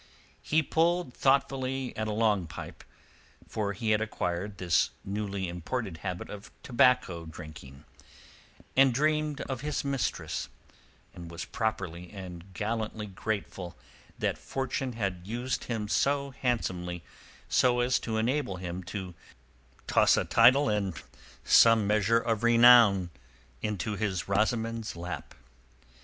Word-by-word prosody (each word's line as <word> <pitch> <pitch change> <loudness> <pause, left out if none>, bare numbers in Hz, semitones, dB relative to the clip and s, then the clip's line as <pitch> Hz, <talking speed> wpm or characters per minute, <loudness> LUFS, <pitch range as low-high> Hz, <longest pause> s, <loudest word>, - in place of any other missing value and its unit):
He 160 +1 +2
pulled 170 -1 +1
thoughtfully 135 -1 0
at 110 0 -2
a - - -1
long 105 -5 +1
pipe—for 100 +6 -8
he 110 +2 -1
had 105 0 +3
acquired 100 -2 -3
this 90 -2 +2 0.2
newly 100 -1 -3
imported 90 +2 -4
habit 90 +1 -5
of 105 0 -9
tobacco 125 - +2
drinking—and 75 - -4
dreamed 150 0 +1
of 130 -3 -4
his 150 -1 -2
mistress, 135 -2 -2 0.6
and 85 -1 -9
was 85 0 -6
properly 90 -6 -3
and 95 -2 -9
gallantly 110 0 -3
grateful 95 -3 -5 0.4
that - - -1
fortune 135 -1 -3
had 100 -6 -2
used 120 +4 -3
him 110 -3 -3
so 140 +5 +1
handsomely 90 -9 -2 0.6
as 125 0 +3
to 110 -1 -3
enable 120 -2 0
him 90 0 -5
to 95 -1 -6 0.7
toss - - +4
a - - +1
title 130 +5 +5
and 100 -5 -1 0.4
some 115 -2 +6
measure 105 +2 +3
of 115 -2 0
renown 115 -6 +6 0.5
into 105 0 -2
his 95 -4 -2
Rosamund's 110 +2 0
lap. 85 +1 -6
110 Hz, 120 wpm, -29 LUFS, 90-125 Hz, 0.7 s, some